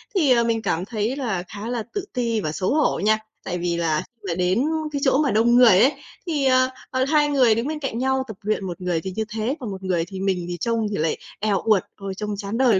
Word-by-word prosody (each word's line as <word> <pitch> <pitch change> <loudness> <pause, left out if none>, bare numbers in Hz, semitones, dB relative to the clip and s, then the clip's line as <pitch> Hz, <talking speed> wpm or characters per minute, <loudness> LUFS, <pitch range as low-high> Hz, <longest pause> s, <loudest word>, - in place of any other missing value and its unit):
thì, 305 -9 +3
ờ, 235 -1 +5
mình 230 -1 0
cảm 180 -4 -1
thấy 225 +2 -2
là 220 -10 -2
khá 205 +4 -7
là 240 -2 -2
tự 405 -2 -3
ti 235 -3 0
và 155 - -2
xấu 185 - -1
hổ 305 0 +2
nha. 215 +2 +3 0.2
Tại 180 - -3
vì 170 -1 -1
là 160 -2 0 0.2
là 175 -4 -3
đến 185 +6 +1 0.3
cái 285 -1 -3
chỗ 265 0 +4
mà 285 - +1
đông 230 +3 +4
người 235 -7 +7
ấy, 260 +7 +6 0.4
thì, 300 -5 0
ờ, 255 0 +4 0.2
ờ, 260 0 +1
hai 295 +1 +3
người 255 -6 +4
đứng 230 +5 -1
bên 310 0 -3
cạnh 270 -6 -3
nhau 265 +1 +1
tập 220 -4 -8
luyện, 210 -1 -1
một 180 +1 -6
người 175 -2 -1
thì 190 +2 -5
như 220 - 0
thế, 220 +5 -2
còn 240 -6 -5
một 190 0 -7
người 175 -3 0
thì 190 -2 -7
mình 190 -2 0
thì 175 0 -4
trông 225 +4 0
thì 205 - -3
lại 155 0 0 0.2
èo 205 -2 +1
uột, 215 -4 +3
ôi, 195 -1 -6
trông 210 -1 -3
chán 200 +2 -4
đời 240 -6 +4
220 Hz, 265 wpm, -23 LUFS, 190-255 Hz, 0.4 s, người